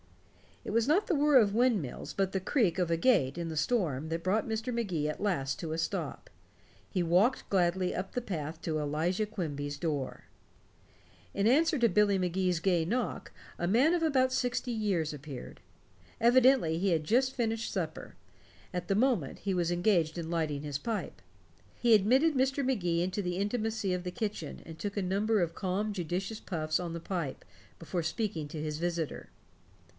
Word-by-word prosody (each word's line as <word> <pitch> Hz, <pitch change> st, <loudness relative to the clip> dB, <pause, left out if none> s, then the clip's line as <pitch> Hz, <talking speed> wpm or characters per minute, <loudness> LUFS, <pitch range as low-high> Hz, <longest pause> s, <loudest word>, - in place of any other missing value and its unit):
It -, -, -5 dB
was 230 Hz, +2 st, +2 dB
not 365 Hz, +8 st, +3 dB
the 365 Hz, -, +1 dB
whir 290 Hz, -1 st, +5 dB
of 210 Hz, -5 st, +4 dB
windmills 225 Hz, -, 0 dB
but 195 Hz, -1 st, 0 dB
the 190 Hz, -, +1 dB
creak 190 Hz, -, +1 dB
of 180 Hz, -2 st, +1 dB
a 165 Hz, -, +2 dB
gate 170 Hz, -, +3 dB
in 170 Hz, -1 st, -3 dB
the 160 Hz, -, -5 dB
storm 155 Hz, -, 0 dB
that 165 Hz, +1 st, -3 dB
brought 205 Hz, +5 st, +1 dB
Mr. 225 Hz, +3 st, -2 dB
Magee 180 Hz, -10 st, -1 dB
at 150 Hz, -, -5 dB
last 170 Hz, -8 st, -1 dB
to 165 Hz, -4 st, -4 dB
a -, -, -2 dB
stop. 165 Hz, -, -3 dB, 0.6 s
He 185 Hz, -, -1 dB
walked 185 Hz, +10 st, +2 dB
gladly 180 Hz, -1 st, +1 dB
up 190 Hz, +1 st, -4 dB
the 250 Hz, -, -1 dB
path 160 Hz, -6 st, -5 dB
to 155 Hz, -2 st, -1 dB
Elijah 160 Hz, +8 st, 0 dB
Quimby's 145 Hz, -9 st, -4 dB
door. 145 Hz, -5 st, -3 dB, 1.1 s
In 200 Hz, +1 st, +1 dB
answer 315 Hz, +6 st, +4 dB
to 235 Hz, -1 st, +4 dB
Billy 205 Hz, +1 st, +3 dB
Magee's 180 Hz, -1 st, 0 dB
gay 175 Hz, -2 st, +2 dB
knock, 240 Hz, +8 st, -2 dB, 0.3 s
a 175 Hz, -, 0 dB
man 255 Hz, -, +4 dB
of 340 Hz, -, 0 dB
about 260 Hz, -5 st, +3 dB
sixty 250 Hz, -1 st, -1 dB
years 195 Hz, -9 st, 0 dB
appeared. 145 Hz, -2 st, -9 dB, 0.6 s
Evidently 245 Hz, -8 st, +5 dB
he 195 Hz, +3 st, +1 dB
had 160 Hz, -2 st, +1 dB
just 255 Hz, -, +2 dB
finished 225 Hz, -1 st, -1 dB
supper; -, -, -4 dB, 0.6 s
at 180 Hz, 0 st, -3 dB
the 195 Hz, -, +1 dB
moment 220 Hz, -, +1 dB
he 195 Hz, -2 st, -1 dB
was 175 Hz, -1 st, +1 dB
engaged 175 Hz, -3 st, +2 dB
in 165 Hz, -1 st, -4 dB
lighting 155 Hz, -4 st, -1 dB
his 145 Hz, -2 st, -3 dB
pipe. 225 Hz, +6 st, -4 dB, 0.6 s
He 240 Hz, -1 st, +4 dB
admitted 260 Hz, +10 st, +4 dB
Mr. 270 Hz, +2 st, +1 dB
Magee 175 Hz, -10 st, +1 dB
into 185 Hz, +3 st, -2 dB
the 180 Hz, 0 st, -2 dB
intimacy 215 Hz, -1 st, -1 dB
of 180 Hz, -, -4 dB
the 180 Hz, -, -4 dB
kitchen, 210 Hz, +1 st, -4 dB
and 160 Hz, -1 st, -9 dB
took 205 Hz, +4 st, -4 dB
a -, -, +1 dB
number 205 Hz, +3 st, +1 dB
of 170 Hz, -1 st, -1 dB
calm 200 Hz, +2 st, -1 dB
judicious 190 Hz, +4 st, -3 dB
puffs 155 Hz, -4 st, -2 dB
on 175 Hz, -2 st, -4 dB
the 170 Hz, -, -4 dB
pipe 165 Hz, -6 st, -4 dB, 0.3 s
before 170 Hz, +1 st, -3 dB
speaking 170 Hz, -3 st, -2 dB
to 155 Hz, 0 st, -5 dB
his 150 Hz, -1 st, -3 dB
visitor. 170 Hz, -2 st, -3 dB
185 Hz, 180 wpm, -31 LUFS, 165-225 Hz, 1.1 s, whir